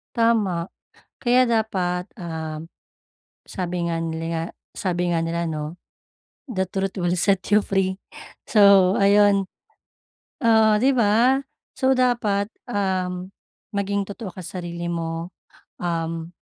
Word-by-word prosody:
Tama. 230 -4 +3 0.7
Kaya 245 0 +4
dapat, 185 -6 0 0.2
ah, 160 -3 -5 0.9
sabi 180 -2 -4
nga 165 - -1
nila 165 0 -3
nga 165 - -1 0.4
sabi 180 -1 0
nga 165 - +1
nila, 170 +1 -2
'no? 155 -1 -3 0.9
The 190 - +2
truth 195 0 -2
will 175 0 +1
set 195 +1 +2
you 210 - +5
free. 190 -1 0 0.5
So, 200 -3 +6
ayun. 200 -1 +4 1.0
Oo, 220 -1 +5
'di 270 - +5
ba? 235 +5 +4 0.4
So 265 0 +3
dapat, 230 -5 +1 0.2
um, 185 -3 -1 0.4
maging 200 0 0
totoo 200 0 -7
ka 185 - -8
sarili 175 -1 -5
mo. 165 0 -3 0.5
Um 165 0 -3
190 Hz, 115 wpm, -23 LUFS, 170-210 Hz, 1.0 s, So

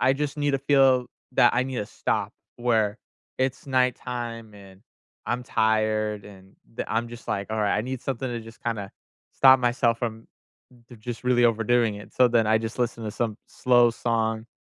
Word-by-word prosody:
I 130 +1 +4
just 145 +1 -3
need 145 -1 0
to 135 - +1
feel 135 -3 +4 0.3
that 120 -1 +4
I 125 - +3
need 130 -2 -4
a 105 - -3
stop, - - -2 0.2
where 115 -3 +1 0.4
it's 130 +1 -1
nighttime 120 -4 -2
and 95 -1 -15 0.5
I'm 125 +1 -1
tired 110 -2 0
and 95 -1 -15 0.2
the - - -5
I'm 115 +1 0
just 120 0 -11
like, 100 +1 -2
"Alright. 105 -2 +1
I - - -1
need 130 +1 -5
something 130 -1 -3
to 120 -1 -4
just 115 0 -14
kinda 105 -4 -3 0.4
stop 130 -1 +6
myself 120 -1 +1
from 115 -2 -4 0.6
the 120 - -12
just 120 +3 -7
really 125 -1 +3
overdoing 115 0 +2
it." 105 - -12
So, 125 -1 +4
then 115 -2 +2
I 110 0 +4
just 115 +2 -6
listen 115 -2 -2
to 105 - -3
some 110 -3 -2
slow 120 -1 +3
song 115 -1 -1
115 Hz, 185 wpm, -25 LUFS, 110-125 Hz, 0.6 s, stop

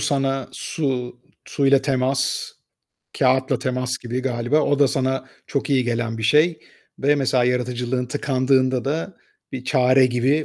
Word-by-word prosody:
sana 135 -2 -1
su 125 -5 -3 0.3
suyla 140 -1 +2
temas, 130 0 0 0.7
kâğıtla 130 +1 +2
temas 125 0 -2
gibi 120 +1 -4
galiba. 125 +3 0
O 145 -2 +1
da 140 -1 +4
sana 130 0 -1 0.2
çok 140 0 -3
iyi 130 -2 +2
gelen 115 -1 -2
bir 110 - -5
şey. 155 +8 +3 0.4
Ve 145 +2 +3
mesela 130 -3 +1
yaratıcılığın 125 0 -1
tıkandığında 130 -2 +1
da 160 +7 -3 0.4
bir 130 -1 -6
çare 130 -1 +4
gibi 130 +5 +1
130 Hz, 140 wpm, -22 LUFS, 125-140 Hz, 0.7 s, da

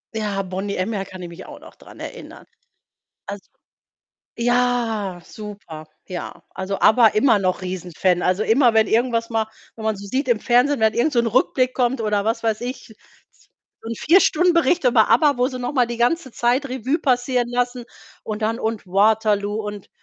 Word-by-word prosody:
Ja, 205 -3 -2
Boney 190 +2 -4
M., 195 +5 -2
ja, 195 -1 -3
kann 185 -1 -10
ich 175 - -7
mich 170 +2 -11
auch - - -11
noch - - -15
dran - - -16
erinnern. - - -9 0.8
Also 205 -1 -7 0.9
ja, 235 -6 0
super, 200 -8 -10 0.2
ja. 175 -1 -7
Also, 190 +1 -4
ABBA 225 0 +6
immer 215 0 +3
noch 185 -1 -1
riesen 180 -1 -5
Fan. 180 +2 +1
Also 185 +3 +1
immer, 235 +1 +3
wenn 220 -1 +4
irgendwas 230 0 +1
mal 220 -1 0 0.3
wenn 220 - -8
man 220 -2 0
so 200 +1 -9
sieht 260 +5 -2
im 225 -3 +2
Fernsehen 250 +2 +2
wenn 220 0 +3
irgend 290 +6 +1
so 240 - +2
'n 235 - -1
Rückblick 255 +2 +1
kommt, 250 -1 0
oder 210 -1 0
was 230 +1 -1
weiß 220 -1 0
ich, 245 -2 -7 0.9
so 225 - -8
'n 230 - -3
4 365 +5 +4
Stunden 355 +3 +3
Bericht 335 -1 +2
über 235 -3 +4
ABBA, 275 +3 +4
wo 250 +1 +2
sie 255 -2 -6
noch 245 +3 -3
mal 250 -4 +2
die 235 0 -5
ganze 260 +1 0
Zeit 250 +4 +1
Revue 260 +5 -1
passieren 250 -1 0
lassen 245 0 -2 0.4
und 215 0 -5
dann 225 +2 0
und 220 -3 -3
„Waterloo“ 205 +1 +2
und 205 -1 -7
225 Hz, 190 wpm, -21 LUFS, 205-245 Hz, 0.9 s, ABBA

